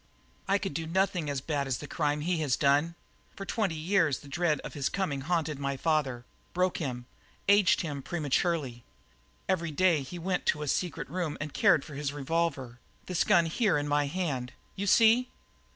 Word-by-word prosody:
"I 195 - +3
could 195 -5 -4
do 160 +2 -3
nothing 180 -2 0
as 140 -2 -2
bad 140 -1 -2
as 130 -2 -1
the - - -8
crime 150 0 -1
he 175 +3 0
has 145 -5 +1
done. 145 +4 +2 0.4
For 195 - -6
twenty 200 -6 -1
years 160 -3 +2
the 145 - -14
dread 170 +1 0
of - - -8
his 140 -3 -1
coming 150 -9 -2
haunted 155 -1 -1
my 140 -1 -2
father, 135 -6 0 0.3
broke 180 0 +1
him, 125 -6 -4 0.4
aged 200 -1 +5
him 145 -5 -4
prematurely. 145 -4 -1 0.6
Every 170 -3 0
day 165 0 +3
he 135 +7 -7
went 180 +2 -2
to 150 - +1
a - - -5
secret 170 +4 -1
room 175 -5 -3
and 145 0 -5
cared - - +4
for 150 - -10
his 140 0 -3
revolver 145 -4 -2 0.3
this 180 -2 +1
gun 170 - +4
here 185 +2 +1
in 145 0 -2
my 145 0 +2
hand, 140 -6 -3 0.2
you 200 +1 -3
see? 230 +5 +5
155 Hz, 185 wpm, -29 LUFS, 140-180 Hz, 0.6 s, aged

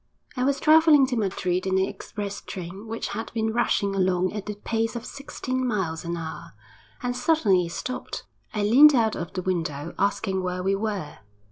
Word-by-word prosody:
I 250 - -1
was 275 +1 +1
travelling 310 -2 +6
to 260 -1 -2
Madrid 185 -3 -1
in 190 0 +2
an 190 - +3
express 205 0 -6
train 190 +3 -7
which 225 +1 -4
had 225 +2 -5
been 220 -1 0
rushing 205 -4 +1
along 185 -1 +1
at 210 -1 -5
the 210 - -3
pace 225 +2 -2
of 235 0 -5
sixteen 260 -2 -4
miles 190 -10 -1
an 170 0 -3
hour, 160 -1 -7 0.5
when 245 0 -1
suddenly 245 - +2
it - - -8
stopped. 255 +8 -5 0.3
I 210 - -1
leant 275 +8 +8
out 225 -3 +2
of 170 - -5
the 185 - -3
window, 165 -4 -2
asking 195 -1 0
where 180 0 -3
we 195 +1 +2
were. 200 -6 -3
205 Hz, 190 wpm, -25 LUFS, 185-240 Hz, 0.5 s, leant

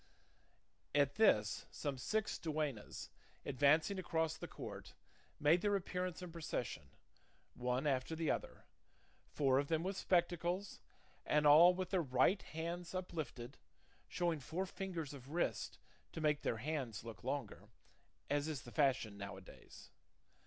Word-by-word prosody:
At 140 -1 +4
this 105 - +3
some 140 -3 -4
six 220 - -1
duennas, 150 -8 -3 0.4
advancing 155 +8 +3
across 160 -3 0
the - - -7
court, - - -8 0.4
made 160 +4 +5
their 205 0 +2
appearance 180 -2 -3
in 180 - -7
procession, 125 - -4 0.6
one 125 +2 -1
after 135 +2 0
the 160 -1 +1
other, - - -4 0.6
four 135 -2 +3
of 140 - -1
them 160 +1 +1
with 190 +2 -2
spectacles, 175 +1 0 0.4
and 150 0 +2
all 165 +5 +9
with 185 0 -3
their 190 -3 +3
right 130 +7 +3
hands 170 +3 -5
uplifted, 150 -8 -5 0.5
showing 170 -3 0
four 165 +8 -3
fingers 180 -6 -4
of 135 -1 -10
wrist 170 +3 -1 0.4
to - - -5
make 150 -2 +2
their 115 - 0
hands 130 -5 -3
look 115 -5 -9
longer, 120 -6 -4 0.6
as 145 +1 0
is 150 -6 -3
the 120 - -10
fashion 130 -8 +1
now 100 -1 -6
a - - -10
days. 90 - -14
155 Hz, 140 wpm, -38 LUFS, 130-175 Hz, 0.6 s, all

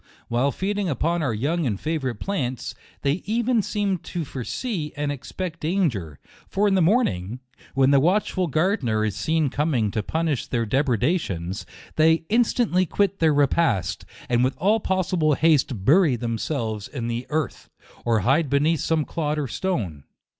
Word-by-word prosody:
While 125 +4 +1
feeding 200 +2 -2
upon 165 +4 0
our 140 -5 0
young 145 +8 0
and 105 -5 -2
favorite 150 -6 -2
plants, 130 - -3 0.3
they 140 +6 +1
even 235 +1 +2
seem 205 -2 -1
to 170 0 -5
foresee 150 - -4
and 145 0 -1
expect 170 +5 -5
danger; 145 - -1 0.3
for 205 +2 +1
in 200 - +2
the 190 - +3
morning, 125 - +1 0.4
when 135 0 +4
the 140 - +6
watchful 185 +3 +1
gardener 150 - +1
is 105 - -2
seen 155 -4 0
coming 135 -8 0
to 110 - -1
punish 160 +3 -1
their 115 -2 -1
depredations, 115 - 0 0.3
they 160 +1 +4
instantly 220 -5 +2
quit 200 +3 0
their 160 -1 +4
repast, 130 - +1 0.2
and 120 0 +2
with 130 - 0
all 205 +7 +3
possi 185 -2 -1
ble 155 -2 +3
haste 135 -10 +2
bury 155 - +5
themselves 115 -2 -3
in 125 -3 -5
the 120 +1 -3
earth, 155 -3 -3 0.3
or 115 -2 +2
hide 135 - +2
beneath 150 +3 +2
some 160 0 0
clod 155 -2 -2
or 145 -2 -1
stone. 105 - -3
150 Hz, 160 wpm, -24 LUFS, 120-180 Hz, 0.4 s, the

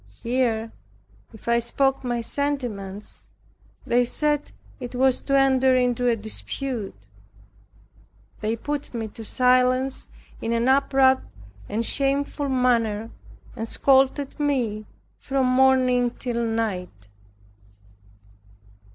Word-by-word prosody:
Here, 230 -2 0 0.6
if 220 - -16
I 235 0 +3
spoke 270 +3 +1
my 240 -1 -1
sentiments, 230 -8 -4 0.6
they 245 +1 +3
said 295 +4 0 0.3
it 250 -1 -7
was 260 0 +2
to 275 0 +1
enter 265 -1 +4
into 245 -1 +1
a 235 - +3
dispute. 225 +1 -5 1.4
They 215 +1 -1
put 290 +2 -5
me 225 -2 -3
to 225 - -10
silence 255 +2 +2 0.3
in 230 - -1
an 235 +1 +1
abrupt 265 -1 +3 0.4
and 225 +3 0
shameful 280 +2 0
manner, 230 -4 +1 0.4
and 225 - -4
scolded 270 +3 +2
me 240 -8 -1 0.3
from 270 -1 0
morning 255 -1 +3
till 235 -1 -3
night. 190 - -3
250 Hz, 105 wpm, -24 LUFS, 230-270 Hz, 1.4 s, enter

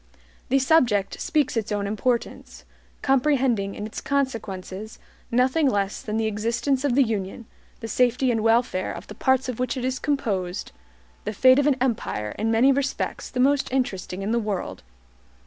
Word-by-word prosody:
The 270 - +4
subject 255 -8 +2
speaks 300 -6 +1
its 225 -1 -2
own 205 -1 -1
importance; 235 +4 -2 0.4
comprehending 260 -7 +2
in 210 - -5
its 215 - -6
consequences 220 -7 -3 0.3
nothing 260 +5 +3
less 200 -3 -1
than 215 0 -3
the 225 - 0
existence 230 +6 0
of 275 -4 +1
the 275 - +6
UNION, 220 0 -3 0.4
the 225 - -4
safety 250 +2 +2
and 225 -2 0
welfare 225 -4 +2
of - - -8
the - - -9
parts 260 0 +1
of 250 -2 -4
which 255 +2 -1
it 250 - -2
is 260 0 -1
composed, 200 -10 -2 0.5
the 210 - -3
fate 255 +5 +6
of 285 - +2
an 290 - +4
empire 220 - -1
in 220 +1 0
many 230 +5 +5
respects 275 0 -2
the 250 - -4
most 275 +1 +2
interesting 195 -7 -2
in 205 - -1
the 235 - +2
world. 205 - -4
235 Hz, 170 wpm, -24 LUFS, 210-265 Hz, 0.5 s, the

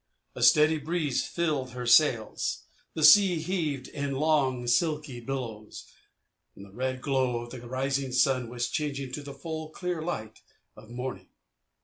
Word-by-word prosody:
A - - -8
steady 155 +1 +5
breeze 155 -3 -1
filled 150 -7 -2
her 125 0 -5
sails. 120 -3 +2 0.3
The 155 - -2
sea 195 +1 +8
heaved 155 -6 -2
in 140 -1 -4
long, 135 -4 +1
silky 150 0 0
billows. 115 -4 -6 0.7
The 100 0 -12
red 130 +3 -3
glow 130 -3 0
of 120 0 -10
the 125 - -8
rising 135 +1 -1
sun 125 -1 +2
was 120 0 -2
changing 140 -3 -3
to 150 - -5
the 140 -1 -9
full, 160 +2 -6
clear 175 0 -4
light 110 -10 -5 0.3
of 110 +1 -15
morning. 120 -6 -6
135 Hz, 145 wpm, -28 LUFS, 125-155 Hz, 0.7 s, sea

